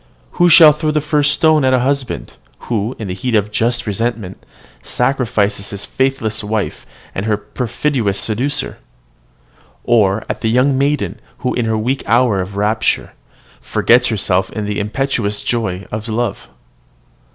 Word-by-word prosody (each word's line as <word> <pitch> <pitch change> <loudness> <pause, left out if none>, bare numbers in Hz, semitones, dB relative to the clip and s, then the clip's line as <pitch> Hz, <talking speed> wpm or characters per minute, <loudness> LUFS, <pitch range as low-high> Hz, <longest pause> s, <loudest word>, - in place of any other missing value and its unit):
Who 175 - +6
shall 160 -1 +9
throw 155 +1 -2
the 150 0 +1
first 150 -1 +1
stone 155 -2 +3
at 130 0 +4
a - - +2
husband, 135 -1 -2 0.3
who, 115 +1 -2
in 110 - -5
the 90 - -3
heat 115 +6 -2
of 105 0 +1
just 120 +2 +1
resentment, 110 -2 -3 0.4
sacrifices 120 -6 0
his 100 -1 -6
faithless 130 -5 -1
wife 105 0 -3 0.3
and 100 +3 -3
her 105 -1 +2
perfidious 120 -1 -2
seducer? 135 +6 -2 1.0
or 110 -3 +2
at - - -4
the 110 - 0
young 130 +4 +3
maiden, 140 +2 0 0.3
who, 125 - +1
in 120 - -1
her 110 0 0
weak 125 +5 -1
hour 115 -4 +3
of 95 +2 -6
rapture, 105 +2 0 0.5
forgets 125 +1 +3
herself 95 -3 0
in 105 -2 -4
the 105 0 -2
impetuous 105 -1 -2
joys 100 -6 -2
of 110 +1 -5
love? 110 -2 -2
115 Hz, 150 wpm, -17 LUFS, 105-130 Hz, 1.0 s, shall